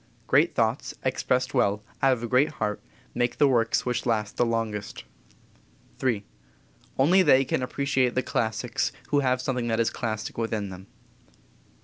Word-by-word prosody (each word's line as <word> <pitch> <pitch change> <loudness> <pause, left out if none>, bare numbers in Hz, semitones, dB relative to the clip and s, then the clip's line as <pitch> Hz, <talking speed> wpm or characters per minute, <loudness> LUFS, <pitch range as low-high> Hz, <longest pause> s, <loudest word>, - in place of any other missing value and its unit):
Great - - +3
thoughts, - - 0
expressed 130 0 0
well, 105 -5 +1 0.2
out 135 -1 +5
of 120 -2 -4
a - - -2
great 130 +5 +2
heart, 105 -1 -3 0.3
make 120 0 -1
the 145 - +5
works 115 -4 +2
which 125 0 -1
last 110 -2 0
the - - +2
longest. 110 -3 -3 1.0
III. 115 -6 0 0.7
Only 170 +8 +5
they 135 -6 +5
can - - -1
appreciate 130 -1 0
the 130 - +1
classics 115 +1 -1 0.2
who 145 - +3
have 130 -2 +1
something 125 -3 -1
that 115 -1 0
is 115 - +2
classic 110 -1 -4
within 110 -3 -2
them. 95 +1 -10
120 Hz, 155 wpm, -26 LUFS, 110-130 Hz, 1.0 s, out